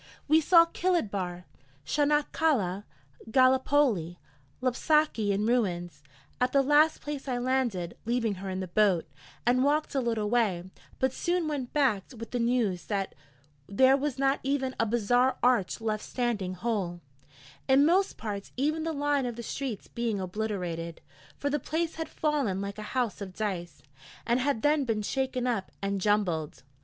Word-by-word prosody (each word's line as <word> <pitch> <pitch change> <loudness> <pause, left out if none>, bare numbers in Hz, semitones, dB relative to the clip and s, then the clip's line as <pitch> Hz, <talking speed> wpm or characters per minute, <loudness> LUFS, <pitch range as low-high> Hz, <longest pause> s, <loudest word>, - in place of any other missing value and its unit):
We 310 +2 +5
saw 335 +1 +7
Kilid 340 - 0
Bahr, 180 -2 -4 0.4
Chanak 295 0 +1
Kaleh, 205 - +1 0.4
Gallipoli, 255 - +3 0.4
Lapsaki 255 -3 +2
in 200 +2 0
ruins; 180 -10 0 0.4
at 250 0 +2
the 275 -1 +4
last 295 +3 +4
place 290 -2 -5
I 250 -2 -1
landed, 245 -9 -1
leaving 230 -2 0
her 195 - -4
in 185 0 -3
the 185 - -4
boat, 185 -2 +2 0.4
and 250 +2 +3
walked 300 +2 +1
a 275 - +1
little 225 -3 -1
way, 205 -6 +1 0.3
but 260 0 +1
soon 345 +1 0
went 280 -5 -3
back 255 -10 +2
with 225 0 -8
the 245 - -1
news 230 -6 0
that 200 -2 -2 0.5
there 260 +6 +5
was 280 -1 -2
not 275 +1 +2
even 265 -1 -1
a 225 - +2
bazaar 245 +3 +2
arch 240 -7 +2
left 215 -1 -2
standing 215 -7 -2
whole, 185 -4 -2 0.7
in 270 +1 +5
most 375 +5 +2
parts 205 -2 -5
even 305 +4 0
the 325 0 -2
line 285 -2 0
of 240 - -4
the 235 - -7
streets 250 -2 -4
being 230 -4 -2
obliterated, 180 -4 -4 0.4
for 285 - -2
the 295 - +1
place 325 +5 -2
had 320 - -4
fallen 285 -11 0
like 200 +1 -5
a 210 - -7
house 240 -5 -1
of 190 -2 -7
dice, 185 -6 -4 0.4
and 240 +1 +2
had 260 -4 0
then 295 0 +3
been 225 -4 -1
shaken 260 +1 -1
up 230 -6 -1
and 195 0 -2
jumbled. 180 -10 0
240 Hz, 165 wpm, -28 LUFS, 200-280 Hz, 0.7 s, saw